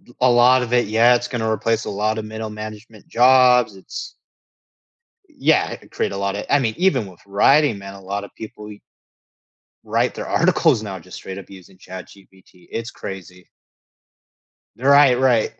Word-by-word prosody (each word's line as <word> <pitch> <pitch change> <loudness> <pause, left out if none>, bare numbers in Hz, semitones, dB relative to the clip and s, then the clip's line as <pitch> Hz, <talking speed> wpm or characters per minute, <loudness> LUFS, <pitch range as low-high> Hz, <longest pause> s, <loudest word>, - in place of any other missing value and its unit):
d 120 - -20
a 130 0 +4
lot 125 +1 +5
of 120 -1 -5
it 120 -2 +2
yeah, 115 +3 +4
it's 120 0 -2
gonna 110 -2 -2
replace 115 0 -1
a - - -5
lot 105 +2 -1
of 110 - -4
middle 110 0 -6
management 110 0 -10
jobs 125 -3 +4
it's 95 - -9 1.1
Y - - -25
yeah 160 - +1 0.2
create - - -2
a 100 - -5
lotta 100 +1 -3
I 145 - +5
mean, 115 -5 -1
even 145 - +1
with 90 -3 -15
writing, 120 +5 +3
man, 100 0 -10
a 100 - -13
lotta 100 +1 -5
people 105 -1 -10
e 105 - -13 1.0
write - - -1
their - - -6
articles 115 - +2
now 100 -3 -6
just 90 +2 -12
straight 95 - -8
up 100 - -11
using 95 -1 -15
ChatGPT 95 0 -14
it's 115 +1 -5
crazy. 90 -2 -10 1.3
Right, 135 0 +5
right. 125 -4 +2
110 Hz, 170 wpm, -20 LUFS, 100-125 Hz, 1.3 s, lot